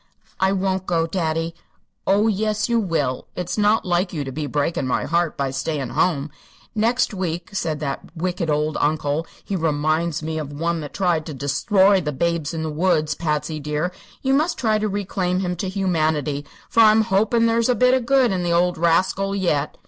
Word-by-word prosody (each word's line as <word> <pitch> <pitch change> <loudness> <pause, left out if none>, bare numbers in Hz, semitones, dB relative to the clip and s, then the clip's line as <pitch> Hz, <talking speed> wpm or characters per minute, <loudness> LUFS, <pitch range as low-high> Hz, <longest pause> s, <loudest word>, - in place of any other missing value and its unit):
"I 190 0 +3
won't 190 -1 -1
go, 165 -2 +1
daddy." 165 -1 -1 0.5
"Oh, 200 +3 +4
yes 215 0 0
you 235 -1 +2
will. 160 - -1
It's 180 -1 -3
not 210 +1 +2
like 180 +1 +1
you 150 -5 -3
to 135 - -6
be 150 +2 -4
breakin' 145 -1 -1
my 125 - 0
heart 170 +1 0
by 140 -1 -1
stayin' 135 -1 -3
home. 150 -4 0 0.4
Next 230 +2 +1
week, 175 -3 -3
said 160 -6 -2
that 145 +3 -5
wicked 175 -1 -2
old 150 +1 0
uncle 150 +1 0 0.2
he 200 - -3
remoinds 155 0 0
me 160 0 -3
of 150 -2 -5
the 145 - -9
one 165 +2 -1
that 145 - -8
tried 175 -5 +1
to 155 - -6
desthroy 190 +8 +3
the 150 - -1
Babes 170 +1 -1
in 160 -2 -3
the 160 - -3
Woods, 155 -1 +1
Patsy 150 -1 -2
dear. 150 +4 -2 0.3
You 265 0 +2
must 310 +5 +1
try 215 -3 +1
to 215 - 0
reclaim 190 -2 -1
him 180 -1 -2
to 190 +2 -3
humanity, 155 -7 0 0.2
for - - 0
I'm 220 0 +7
hopin' 220 +4 +2
there's 230 +1 +2
a 250 - +3
bit 250 +1 +4
of 255 -3 +1
good 265 -4 +4
in 185 -2 -1
the 175 -1 -1
old 175 0 +2
rascal 185 +4 +2
yet." 155 -7 0
170 Hz, 195 wpm, -22 LUFS, 155-195 Hz, 0.5 s, I'm